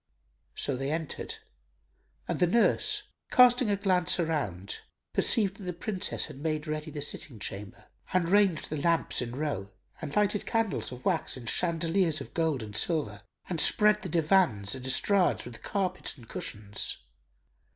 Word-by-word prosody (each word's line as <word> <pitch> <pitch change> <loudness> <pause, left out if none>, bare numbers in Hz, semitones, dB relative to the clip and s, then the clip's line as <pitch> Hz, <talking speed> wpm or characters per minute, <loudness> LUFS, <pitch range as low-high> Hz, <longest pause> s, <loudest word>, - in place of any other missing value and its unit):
So 140 - -1
they 135 +2 -3
entered 160 -2 -3 0.9
and - - -2
the 180 - +4
nurse, 415 - +2 0.3
casting 250 -2 +6
a 205 - +3
glance 185 -3 +2
around, 140 - -2 0.3
perceived 200 -3 +1
that 205 - -11
the 180 - -3
Princess 185 +2 -1
had 135 - -10
made 155 0 -2
ready 155 0 -4
the 145 -1 -4
sitting 140 -3 -5
chamber 100 -1 -7 0.3
and 180 -2 +2
ranged 195 -5 +2
the 155 -2 -2
lamps 165 -3 +2
in 120 0 -4
row 140 -10 -3 0.3
and 145 -2 -5
lighted 210 0 +1
candles 225 - -1
of 125 0 -10
wax 170 -8 0
in 125 - -10
chandeliers 165 +3 +1
of - - -9
gold 160 -7 0
and 105 -1 -8
silver 135 - +1 0.3
and 170 -4 +1
spread 210 0 +4
the 185 - -5
divans 155 - +3
and 130 -1 -4
estrades 190 +7 +3
with 120 -2 -10
carpets 185 -5 -3
and 120 -3 -15
cushions. 105 -1 -3
165 Hz, 160 wpm, -29 LUFS, 130-190 Hz, 0.9 s, casting